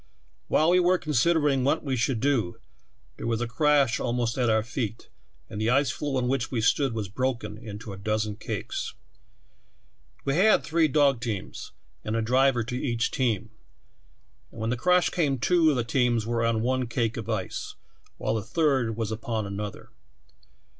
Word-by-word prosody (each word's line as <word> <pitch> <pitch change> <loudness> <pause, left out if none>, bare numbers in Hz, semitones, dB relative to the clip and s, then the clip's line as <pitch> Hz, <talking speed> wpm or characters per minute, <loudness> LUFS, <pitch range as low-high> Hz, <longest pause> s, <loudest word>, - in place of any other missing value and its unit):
"While 160 +3 +3
we 180 - +5
were 180 +1 +4
considering 150 -2 +2
what 145 +4 +1
we 135 -3 -1
should 120 0 0
do, 125 -11 +1 0.6
there - - -5
was 115 -1 0
a 120 - -1
crash 145 0 +2
almost 120 -1 -1
at 125 -3 +1
our 110 -1 +3
feet, 115 -2 -4 0.4
and 110 -1 -6
the 110 - +1
ice 135 +3 +3
floe 145 -2 -3
on 125 -1 0
which 135 +2 0
we 125 - -2
stood 130 +3 +2
was 105 -3 -3
broken 120 0 -2
into 110 -2 -8
a - - -8
dozen 110 0 -1
cakes. 105 - -4 1.3
We 135 - +1
had 215 +4 +5
three 160 0 +2
dog 140 -3 +3
teams 110 -5 -5 0.3
and 110 - -2
a 115 - +1
driver 125 +1 +3
to 125 +2 -5
each 120 -2 -1
team, 115 -5 -1 1.0
and - - -12
when 110 - -1
the - - +1
crash 180 +7 +3
came 145 -6 +1
two 165 +5 +3
of 150 - +2
the 120 - 0
teams 120 -1 +1
were 115 0 0
on 115 -1 +1
one 130 0 0
cake 115 -1 -1
of 115 -1 -6
ice, 105 -5 -3 0.4
while - - -1
the 110 - -1
third 130 -5 0
was 110 -2 -2
upon 110 0 -3
another. 100 +1 -6
120 Hz, 180 wpm, -26 LUFS, 110-140 Hz, 1.3 s, we